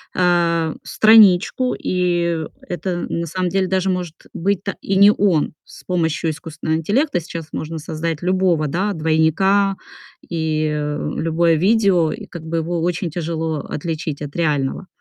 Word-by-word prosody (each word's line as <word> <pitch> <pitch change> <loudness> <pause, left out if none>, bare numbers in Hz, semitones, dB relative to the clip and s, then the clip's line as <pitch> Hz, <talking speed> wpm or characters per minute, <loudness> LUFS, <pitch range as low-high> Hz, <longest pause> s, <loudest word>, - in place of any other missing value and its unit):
э, 170 -3 +2
страничку, 220 +3 +5
и 175 -2 0 0.3
это, 175 0 -3
на 170 - -2
самом 180 +2 -2
деле, 190 +1 0
даже 190 0 0
может 180 -3 -2 0.2
быть-то 200 +2 -1
и 195 - -1
не 200 +2 +7
он. 190 -7 +1
С - - -14
помощью 165 -2 0
искусственного 160 0 -3
интеллекта 205 - +1
сейчас 165 -1 -7
можно 160 +1 -4
создать 160 0 -4
любого, 180 -4 +1
да, 190 +8 -1
двойника, 170 +5 +2 0.5
и 160 -2 -1 0.5
любое 165 +1 +2
видео, 185 -2 +3
и - - -7
как 170 -2 -10
бы 165 +1 -2
его 165 +1 -2
очень 175 +1 -1
тяжело 160 -2 -3
отличить 155 0 -4
от 145 -1 -7
реального. 150 +1 -1
170 Hz, 140 wpm, -20 LUFS, 160-185 Hz, 0.5 s, не